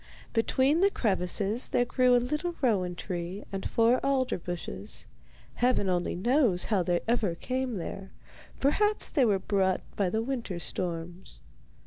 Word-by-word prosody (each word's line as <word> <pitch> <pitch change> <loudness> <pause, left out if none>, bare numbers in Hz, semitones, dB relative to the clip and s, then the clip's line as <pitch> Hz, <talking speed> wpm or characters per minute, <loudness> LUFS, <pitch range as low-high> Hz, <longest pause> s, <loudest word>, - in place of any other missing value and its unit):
Between 260 +6 +2
the 395 +2 +5
crevices 205 - 0
there 245 - +2
grew 250 +1 +3
a - - +6
little 300 +8 -2
rowan 190 -9 +1
tree 180 +2 -5
and 195 -1 -3
four 235 +2 +3
alder 265 -6 +1
bushes. 175 +4 -6 0.5
Heaven 245 -5 +1
only 175 -1 0
knows 230 -1 +3
how 195 - +3
they 175 0 0
ever 220 -7 +1
came 255 +4 -2
there; 190 +2 -6 0.5
perhaps 415 +10 +1
they 275 -6 +3
were 205 -4 +3
brought 190 -1 +1
by 195 -3 +1
the 220 +4 -1
winter 235 -8 -3
storms. 175 +1 -4
215 Hz, 145 wpm, -29 LUFS, 180-255 Hz, 0.5 s, a